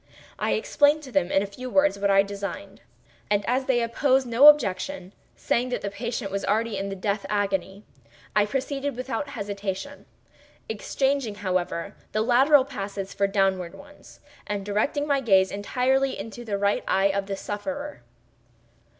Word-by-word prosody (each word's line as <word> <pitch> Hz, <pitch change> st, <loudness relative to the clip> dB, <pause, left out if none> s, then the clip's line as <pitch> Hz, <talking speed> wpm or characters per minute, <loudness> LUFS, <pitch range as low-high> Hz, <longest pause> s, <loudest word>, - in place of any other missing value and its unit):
I -, -, +1 dB
explained 305 Hz, -8 st, +2 dB
to 265 Hz, -, -10 dB
them, 185 Hz, -5 st, +1 dB
in 195 Hz, -, +3 dB
a -, -, -2 dB
few 250 Hz, +6 st, -8 dB
words, 285 Hz, -5 st, +3 dB
what 200 Hz, 0 st, +1 dB
I 195 Hz, 0 st, +5 dB
designed, 200 Hz, 0 st, -7 dB, 0.5 s
and 205 Hz, -1 st, +1 dB
as 255 Hz, +2 st, +1 dB
they 240 Hz, -3 st, +2 dB
opposed 260 Hz, +3 st, +2 dB
no 245 Hz, +4 st, +6 dB
objection, 240 Hz, -6 st, +3 dB, 0.2 s
saying 245 Hz, +2 st, 0 dB
that 250 Hz, -, -2 dB
the 200 Hz, -, -4 dB
patient 230 Hz, -1 st, -4 dB
was 200 Hz, 0 st, -2 dB
already 220 Hz, +1 st, 0 dB
in 195 Hz, 0 st, -3 dB
the 195 Hz, -, -4 dB
death 200 Hz, +1 st, -2 dB
agony, 200 Hz, -1 st, -1 dB, 0.5 s
I 210 Hz, 0 st, +4 dB
proceeded 275 Hz, +3 st, -2 dB
without 255 Hz, +2 st, -4 dB
hesitation—exchanging, 220 Hz, +3 st, -4 dB
however, 185 Hz, -1 st, -2 dB, 0.2 s
the 215 Hz, +1 st, +1 dB
lateral 260 Hz, +4 st, +5 dB
passes 195 Hz, -4 st, -6 dB
for 200 Hz, -, +1 dB
downward 190 Hz, -3 st, 0 dB
ones, 290 Hz, +7 st, -16 dB, 0.3 s
and 200 Hz, -1 st, -3 dB
directing 215 Hz, +8 st, 0 dB
my 280 Hz, -2 st, +2 dB
gaze 190 Hz, -5 st, +4 dB
entirely 255 Hz, +6 st, 0 dB
into 225 Hz, +4 st, -7 dB
the 210 Hz, -4 st, -2 dB
right 200 Hz, +1 st, +1 dB
eye 195 Hz, +1 st, +3 dB
of 195 Hz, 0 st, -2 dB
the 200 Hz, -, -2 dB
sufferer. 285 Hz, -, -5 dB
210 Hz, 160 wpm, -25 LUFS, 200-265 Hz, 0.5 s, no